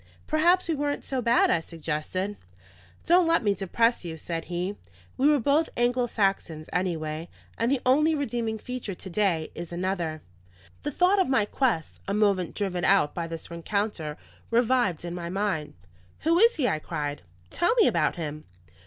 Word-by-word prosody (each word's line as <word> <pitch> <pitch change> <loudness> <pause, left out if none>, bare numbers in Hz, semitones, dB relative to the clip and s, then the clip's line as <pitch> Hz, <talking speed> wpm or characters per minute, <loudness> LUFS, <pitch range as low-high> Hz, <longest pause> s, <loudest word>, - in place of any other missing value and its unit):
"Perhaps 345 +4 +3
we 330 - +1
weren't 290 -1 -2
so 265 -2 -2
bad," 235 0 +4
I - - +3
suggested. 165 +5 -3 0.7
"Don't 350 0 +5
let 330 -4 +3
me 205 -2 +3
depress 230 +5 +1
you," 165 -2 -6
said 165 +1 -4
he. 180 +3 -3 0.4
"We 270 +2 +3
were 300 -1 +5
both 285 +6 +2
Anglo 245 +1 +2
Saxons, 195 -8 -1
anyway, 165 -2 -2 0.3
and 230 +2 0
the 275 -3 +1
only 305 +5 +4
redeeming 240 -6 -2
feature 240 -3 -5
to 190 - -8
day 170 -5 +1
is 170 0 -7
another." 175 -4 -2 0.6
The - - -2
thought 365 +5 +3
of 370 - +2
my 260 -6 +3
quest, 215 - -1
a 200 - 0
moment 200 -5 +1
driven 185 -4 -2
out 190 -7 +4
by 170 -1 -3
this 165 0 -8
rencounter, 170 -3 -2 0.3
revived 235 -8 +2
in 175 - -4
my 170 -1 -5
mind. 190 -5 -2 0.5
"Who 335 +2 +3
is 465 +3 +6
he?" 280 -7 +1
I 155 - 0
cried. 150 -3 -4 0.3
"Tell 350 +8 +2
me 465 - +5
about - - +2
him." 155 -2 -5
200 Hz, 170 wpm, -27 LUFS, 170-260 Hz, 0.7 s, is